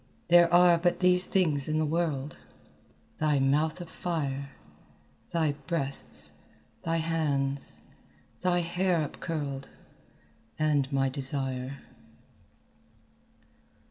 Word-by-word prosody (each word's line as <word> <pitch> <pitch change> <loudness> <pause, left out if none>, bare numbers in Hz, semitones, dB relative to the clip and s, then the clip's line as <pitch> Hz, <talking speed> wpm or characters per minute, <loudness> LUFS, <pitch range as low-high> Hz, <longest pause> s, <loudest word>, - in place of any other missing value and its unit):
There 170 0 +6
are 175 -1 +6
but 175 0 +1
these 180 0 +4
things 155 -8 +1
in 155 0 0
the 155 - +1
world 155 -3 -1 0.8
Thy 150 -2 +2
mouth 150 +5 +1
of 175 - -7
fire, 140 -6 -3 0.8
Thy 160 -3 +1 0.2
breasts, 140 -5 -4 0.5
thy 165 0 0
hands, 145 -4 0 0.6
thy 180 -1 +2
hair 175 0 0
upcurled 140 -5 -5 0.9
And 150 -3 +1
my 135 -1 +2
desire." 135 -1 -2
155 Hz, 95 wpm, -28 LUFS, 140-170 Hz, 0.9 s, There